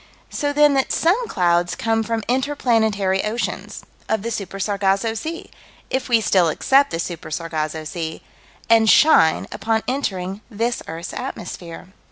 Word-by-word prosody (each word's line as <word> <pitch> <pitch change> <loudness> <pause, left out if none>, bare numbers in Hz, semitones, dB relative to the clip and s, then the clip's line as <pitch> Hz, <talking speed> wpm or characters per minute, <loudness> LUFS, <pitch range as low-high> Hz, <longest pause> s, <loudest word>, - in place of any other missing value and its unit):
So 290 -1 -1
then 295 0 +4
that 270 -1 +1
some 410 +9 +2
clouds 175 - +1
come 225 0 0
from 225 0 -2
inter 265 +4 0
planetary 215 -7 +1
oceans 225 +3 -4 0.3
of 220 -2 0
the 230 - -3
Super 195 -3 -5
Sargasso 200 +2 0
Sea 320 +10 -6 0.4
if 260 0 -2
we 235 -2 +5
still 185 -5 +3
accept 275 - +3
the - - -3
Super 170 -1 -5
Sargasso 155 -1 -3
Sea 160 +1 -5 0.4
and 225 -1 +5
shine, 185 - +5
upon 225 0 -1
entering 195 -7 -2
this 235 +2 -2
earth's 165 +1 -6
atmosphere. 175 0 -7
215 Hz, 150 wpm, -21 LUFS, 175-245 Hz, 0.4 s, we